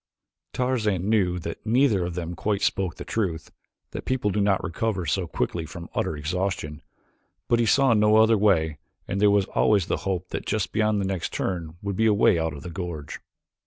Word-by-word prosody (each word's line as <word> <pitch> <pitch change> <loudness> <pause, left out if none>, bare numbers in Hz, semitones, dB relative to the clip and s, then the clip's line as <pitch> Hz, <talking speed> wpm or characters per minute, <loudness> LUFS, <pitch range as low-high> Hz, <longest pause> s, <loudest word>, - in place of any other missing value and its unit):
Tarzan 110 -7 0
knew 90 -5 +2
that 85 -1 -6
neither 115 -4 +3
of 85 -1 -4
them 85 -1 -4
quite 100 +3 -1
spoke 95 -4 0
the - - -8
truth, 90 -8 -2 0.4
that - - -6
people 125 -6 0
do 105 +2 0
not 100 -1 +2
recover 95 0 -2
so 70 - -1
quickly 85 - -2
from 85 +1 -9
utter 80 - -1
exhaustion, 80 -1 -3 0.7
but 120 - +2
he 115 - +2
saw 135 0 +4
no 105 0 +4
other 110 +1 +5
way 80 -8 +2 0.3
and 100 +1 -2
there 105 - +6
was 100 -1 +3
always 105 -5 +3
the - - -1
hope 95 -2 -3
that - - -5
just 110 -3 -1
beyond 110 -1 +1
the 100 - -1
next 95 -3 -3
turn 85 -3 -3
would 100 -1 -2
be 110 - +3
a 105 - +4
way 90 -4 +4
out 80 0 -1
of 70 0 -9
the 90 - -7
gorge. 80 -4 -6
95 Hz, 200 wpm, -25 LUFS, 85-105 Hz, 0.7 s, there